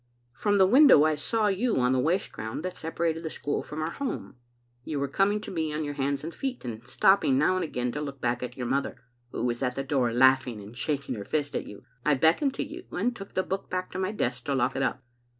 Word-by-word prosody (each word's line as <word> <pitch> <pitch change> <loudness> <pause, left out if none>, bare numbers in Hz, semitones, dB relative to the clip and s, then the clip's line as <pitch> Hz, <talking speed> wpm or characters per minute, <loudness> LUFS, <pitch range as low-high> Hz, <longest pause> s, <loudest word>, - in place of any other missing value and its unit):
" 120 0 -42
From 205 -1 +3
the 190 - +6
window 250 - +7
I 155 0 +3
saw 215 +9 0
you 210 +4 +1
on 125 0 +3
the 130 - +2
waste 170 +9 0
ground 110 +7 -5
that 185 0 -4
separated 165 0 -2
the 160 - -4
school 145 - -2
from 155 +1 -5
our 160 - -2
home. 275 - -4 0.5
You 150 +1 -3
were 140 - 0
coming 195 +9 +2
to - - -7
me 160 -4 -1
on 150 +1 -2
your 145 -1 -3
hands 140 0 -1
and 165 +2 -5
feet, 260 - -4
and 120 0 -6
stopping 190 -4 +4
now 150 +6 +3
and 185 - 0
again 125 -5 -2
to 150 - -4
look 140 -2 -6
back 120 0 -1
at 125 0 -6
your 125 - -3
mother, 135 +2 -1 0.3
who 120 - -3
was 120 0 -1
at 125 -1 0
the 135 - -2
door, 130 -4 +1
laughing 130 -1 +4
and 105 +3 -11
shaking 140 +1 -2
her 105 -4 -5
fist 145 +5 -2
at - - -2
you. 105 - -11 0.2
I 150 - +3
beckoned 165 - +3
to - - -1
you, 350 +4 -9
and 240 +7 -1
took 195 -3 -10
the 185 - +2
book 190 +1 -4
back 185 0 -3
to 185 - -4
my 190 +1 0
desk 125 - -2
to 140 - 0
lock 130 0 +1
it 135 - -1
up. 130 -1 -1
145 Hz, 260 wpm, -27 LUFS, 125-185 Hz, 0.5 s, window